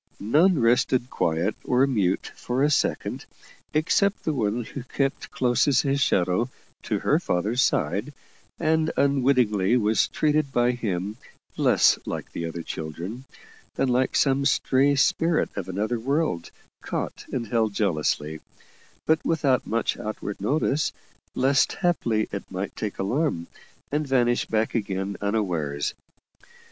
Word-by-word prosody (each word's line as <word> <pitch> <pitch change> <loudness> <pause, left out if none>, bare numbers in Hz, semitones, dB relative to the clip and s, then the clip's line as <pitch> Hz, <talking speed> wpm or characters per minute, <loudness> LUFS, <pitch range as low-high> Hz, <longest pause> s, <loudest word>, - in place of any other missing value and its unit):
None 155 - +3
rested 125 +2 +2
quiet 85 +6 0
or 125 +2 +3
mute 100 -9 0
for 125 +3 -1
a 150 - +3
second, 145 - -1 0.4
except 195 +6 +1
the 155 - 0
one 115 -2 -1
who 135 - -7
kept 135 +2 -2
close 125 0 +1
as 135 -3 +4
his 140 0 0
shadow 95 +3 +2 0.3
to - - -1
her - - +3
father's 105 +8 0
side, - - 0 0.5
and 160 0 +2
unwittingly 125 -6 +3
was 110 -2 +2
treated 150 -2 +1
by 120 -1 +3
him 105 -3 -3 0.4
less - - +4
like - - -5
the 85 - -4
other 80 0 -6
children, 85 - -6 0.5
than 135 - +1
like 125 +1 +1
some 135 0 +3
stray 140 0 +3
spirit 165 +4 +2
of 95 -2 -5
another 110 +5 -1
world, 135 - -1 0.3
caught - - -4
and 115 -4 -3
held 110 -3 +1
jealously, 80 -5 0 0.7
but 160 0 +2
without 145 -6 +1
much 115 +1 -1
outward 105 -2 -5
notice, 145 +5 +1 0.4
lest 135 +2 +3
haply 120 - 0
it 100 - -6
might 95 +2 -5
take 105 -2 -4
alarm, 110 - -1 0.5
and 150 +1 -1
vanish 120 -2 +2
back 110 0 0
again 100 -3 -2
unawares. 90 -9 -1
120 Hz, 135 wpm, -25 LUFS, 100-140 Hz, 0.7 s, as